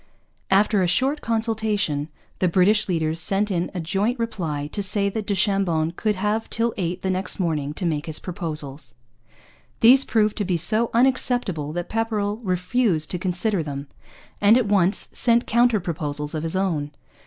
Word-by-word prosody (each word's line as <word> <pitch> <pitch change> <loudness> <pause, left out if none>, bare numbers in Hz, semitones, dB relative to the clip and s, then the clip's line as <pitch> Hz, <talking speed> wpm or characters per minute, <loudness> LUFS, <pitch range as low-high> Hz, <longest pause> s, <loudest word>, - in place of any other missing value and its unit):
After 200 +1 +3
a 180 - +2
short 265 - +1
consultation 220 -9 -1 0.3
the 185 - +2
British 195 +5 +3
leaders 160 -2 0
sent 200 +4 +1
in 175 -1 -1
a - - -2
joint 200 +9 -1
reply 170 -11 -3
to 205 - -2
say 200 +1 +1
that 210 +1 -5
du 200 - 0
Chambon 190 -5 +1
could 210 +4 -1
have 210 +3 -1
till 230 0 0
eight 180 -1 -3
the 190 - 0
next 185 +2 -3
morning 155 -5 -1
to 180 - -4
make 155 -2 -2
his 155 - -2
proposals. 150 - -6 0.9
These 260 +4 +7
proved 215 -2 +1
to 210 - 0
be 180 -3 0
so 215 +7 +1
unacceptable 240 - +1
that 175 0 -4
Pepperrell 215 -2 -1
refused 185 -3 0
to 180 - -2
consider 185 +2 0
them, 140 -2 -6 0.5
and 210 +3 +6
at 250 - +1
once 200 -1 +3
sent 235 0 +3
counter 235 -1 +3
proposals 150 -4 -4
of 155 - -2
his 165 +2 -3
own. 160 -7 -1
190 Hz, 170 wpm, -23 LUFS, 165-220 Hz, 0.9 s, These